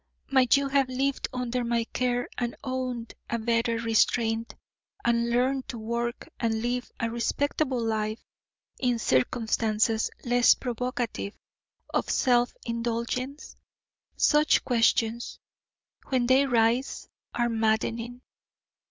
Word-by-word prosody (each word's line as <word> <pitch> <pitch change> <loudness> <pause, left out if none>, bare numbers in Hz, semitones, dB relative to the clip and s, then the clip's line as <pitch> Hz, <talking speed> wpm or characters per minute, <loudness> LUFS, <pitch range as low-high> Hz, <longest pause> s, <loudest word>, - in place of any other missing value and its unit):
Might 265 0 +5
you 280 0 0
have 275 -1 +2
lived 270 +2 -1
under 250 -1 -2
my 235 0 +1
care 245 +1 -1
and 240 -1 -2
owned 255 -3 -3 0.2
a 235 - 0
better 230 0 +1
restraint 230 0 +1 0.5
and 235 0 +2
learned 255 +2 +1
to 240 - -6
work 235 +2 -3
and 225 -1 0
live 245 0 -2
a 230 0 -1
respectable 265 +3 0
life 215 -1 -1 0.6
in 245 -2 +1
circumstances 220 - +1 0.2
less 245 0 +5
provocative 245 -4 -3 0.6
of - - 0
self 245 -2 +3
indulgence? 235 +4 -3 0.6
Such 300 0 +4
questions, 230 -1 +1 0.7
when 255 -3 +1
they 265 +3 +4
rise, 235 +1 +1 0.3
are 240 -1 +2
maddening. 230 +2 -1
240 Hz, 110 wpm, -27 LUFS, 230-255 Hz, 0.7 s, Might